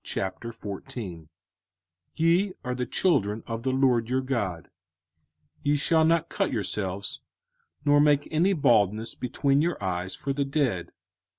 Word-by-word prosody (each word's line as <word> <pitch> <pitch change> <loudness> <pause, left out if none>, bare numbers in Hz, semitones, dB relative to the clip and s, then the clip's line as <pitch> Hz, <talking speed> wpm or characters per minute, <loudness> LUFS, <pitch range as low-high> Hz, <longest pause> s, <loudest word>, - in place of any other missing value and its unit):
05:014:001 100 - -5 0.9
Ye 175 +4 +2
are 125 - -1
the 125 0 -3
children 110 - +1
of 115 0 -4
the 130 - -1
LORD 130 -3 +2
your 130 +1 +1
God: 105 - -3 0.9
ye 145 +1 +2
shall 160 +2 +3
not 165 +1 +3
cut 195 +1 -1
yourselves, 100 -3 -3 0.6
nor 145 0 +5
make 145 -1 +3
any 170 +5 +3
baldness 115 - +2
between 140 +3 +1
your 170 +2 0
eyes 90 -1 -3
for 140 -2 -3
the 140 +1 0
dead. 135 - -1
130 Hz, 130 wpm, -27 LUFS, 105-150 Hz, 0.9 s, nor